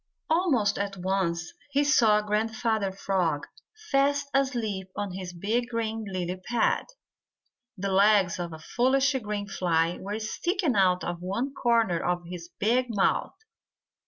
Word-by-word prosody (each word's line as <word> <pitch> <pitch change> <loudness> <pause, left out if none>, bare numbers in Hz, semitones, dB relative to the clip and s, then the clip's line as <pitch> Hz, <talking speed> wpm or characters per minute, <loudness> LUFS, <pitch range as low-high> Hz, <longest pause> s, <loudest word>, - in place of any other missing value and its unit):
Almost 270 - +2
at 200 -1 -3
once 180 -2 -1 0.2
he 285 +1 +2
saw 230 -8 +4
Grandfather 220 0 0
Frog 185 -6 -1 0.5
fast 280 +1 +2
asleep 235 -8 0
on 205 -2 -3
his 185 -1 -6
big 220 +8 -1
green 225 -2 -2
lily 180 -1 -3
pad. 225 +4 0 0.9
The 195 +1 -2
legs 195 -2 +4
of 170 -1 -4
a 160 - -7
foolish 260 - +2
green 210 -1 -3
fly 170 -3 0
were 205 +2 -4
sticking 305 - -1
out 185 -2 +3
of 175 0 -4
one 230 +10 -2
corner 230 -9 +2
of 175 0 -1
his 175 -1 -8
big 245 +5 +2
mouth. 210 -4 +1
205 Hz, 135 wpm, -27 LUFS, 185-240 Hz, 0.9 s, saw